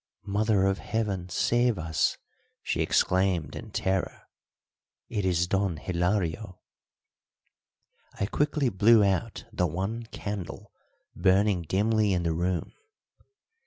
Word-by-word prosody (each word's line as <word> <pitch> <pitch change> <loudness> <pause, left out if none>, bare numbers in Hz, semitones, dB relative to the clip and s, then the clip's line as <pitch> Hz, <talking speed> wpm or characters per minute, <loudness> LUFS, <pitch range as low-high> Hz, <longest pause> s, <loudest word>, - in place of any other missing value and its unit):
"Mother 105 -1 +2
of 95 0 +1
Heaven, 100 -5 -2
save 120 +6 +2
us!" 80 -1 0 0.5
she - - -1
exclaimed 90 -5 +1
in - - -8
terror. 95 0 -2 0.9
"It 105 -4 -2
is 90 -2 +2
Don 95 -2 0
Hilario." 90 +3 -1 1.6
I 100 - +1
quickly 145 +4 0
blew 110 +2 +5
out 100 +3 -1
the 90 -4 +1
one 100 +8 -3
candle 100 -5 -6 0.4
burning 95 0 +3
dimly 105 +4 +1
in 90 -1 0
the 85 -1 0
room. 90 +2 -2
95 Hz, 110 wpm, -27 LUFS, 90-105 Hz, 1.6 s, blew